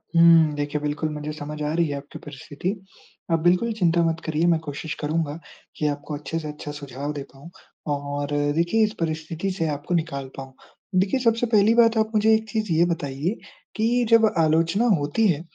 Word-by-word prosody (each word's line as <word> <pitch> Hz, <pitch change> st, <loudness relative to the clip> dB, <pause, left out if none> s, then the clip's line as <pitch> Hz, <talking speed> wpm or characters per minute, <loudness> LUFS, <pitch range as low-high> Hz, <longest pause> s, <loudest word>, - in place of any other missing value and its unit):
हुँ 165 Hz, -2 st, +6 dB
देखिए, 145 Hz, +1 st, -2 dB
बिल्कुल 150 Hz, +1 st, -2 dB
मुझे 150 Hz, 0 st, -5 dB
समझ 150 Hz, 0 st, -7 dB
आ 150 Hz, +1 st, -1 dB
रही 170 Hz, 0 st, +2 dB
है 145 Hz, -, -3 dB
आपकी 140 Hz, +1 st, -10 dB
परिस्थिति। 145 Hz, +4 st, -6 dB, 0.6 s
आप 165 Hz, -, +3 dB
बिल्कुल 180 Hz, +7 st, +3 dB
चिंता 170 Hz, -1 st, +3 dB
मत 165 Hz, 0 st, 0 dB
करिए 160 Hz, +1 st, 0 dB
मैं 165 Hz, -2 st, +3 dB
कोशिश 150 Hz, 0 st, -6 dB
करूँगा 155 Hz, 0 st, -2 dB, 0.4 s
कि 150 Hz, -, 0 dB
आपको 145 Hz, +1 st, -4 dB
अच्छे 150 Hz, +3 st, -4 dB
से 155 Hz, -, -6 dB
अच्छा 150 Hz, 0 st, -7 dB
सुझाव 145 Hz, 0 st, -6 dB
दे 140 Hz, -2 st, -5 dB
पाऊँ 140 Hz, +5 st, -13 dB, 0.5 s
और 145 Hz, 0 st, -4 dB, 0.3 s
देखिए 170 Hz, +7 st, +2 dB
इस 215 Hz, -, -4 dB
परिस्थिति 165 Hz, +3 st, -3 dB
से 165 Hz, -3 st, -2 dB
आपको 145 Hz, +4 st, -3 dB
निकाल 140 Hz, -5 st, -2 dB
पाऊँ। 135 Hz, -1 st, -8 dB, 0.5 s
देखिए 200 Hz, +8 st, +1 dB
सबसे 230 Hz, 0 st, +2 dB
पहली 210 Hz, +2 st, +5 dB
बात 230 Hz, -1 st, +5 dB
आप 220 Hz, 0 st, +1 dB
मुझे 220 Hz, +1 st, +4 dB
एक 220 Hz, 0 st, +1 dB
चीज़ 215 Hz, -5 st, -2 dB
ये 170 Hz, +2 st, +4 dB
बताइए 145 Hz, +6 st, -3 dB, 0.4 s
कि 235 Hz, +2 st, +1 dB
जब 230 Hz, -1 st, +6 dB
आलोचना 165 Hz, +7 st, +2 dB
होती 150 Hz, +10 st, +1 dB
है, 160 Hz, -4 st, +1 dB
160 Hz, 190 wpm, -24 LUFS, 145-190 Hz, 0.6 s, हुँ